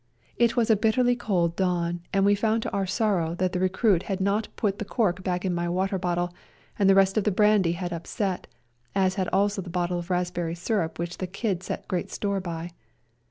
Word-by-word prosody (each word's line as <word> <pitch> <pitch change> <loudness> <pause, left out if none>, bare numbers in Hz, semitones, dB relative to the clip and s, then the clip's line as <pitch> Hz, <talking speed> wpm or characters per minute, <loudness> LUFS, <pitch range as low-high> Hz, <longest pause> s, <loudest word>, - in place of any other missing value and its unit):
It 235 0 +2
was 230 -1 +3
a - - +6
bitterly 240 +4 +2
cold 180 -8 0
dawn, 175 -2 0
and 195 0 +2
we 205 - +5
found 220 +2 +1
to - - -3
our 195 -1 -1
sorrow 185 -5 0
that 185 0 0
the 180 - 0
recruit 185 0 +2
had 195 -1 -1
not 200 +3 +1
put 200 -3 -1
the - - -1
cork 200 -4 0
back 180 0 -1
in 185 - 0
my 175 0 -1
water 190 +2 0
bottle, 175 0 -1 0.5
and 195 -1 +4
the 195 - +6
rest 195 +2 +4
of - - -1
the 210 - +2
brandy 210 -3 +3
had 175 0 -4
upset, 180 +3 -3 0.5
as 190 -1 +3
had 190 -2 -1
also 200 +1 +1
a 180 - -8
bottle 175 0 -1
of 175 +1 -8
raspberry 175 -2 -1
syrup 175 -1 -1
which 170 +1 -4
the 185 - -2
Kid 195 -1 -2
set - - -5
great 180 -3 -2
store 200 -1 -1
by. 170 -1 -5
190 Hz, 215 wpm, -26 LUFS, 175-205 Hz, 0.5 s, a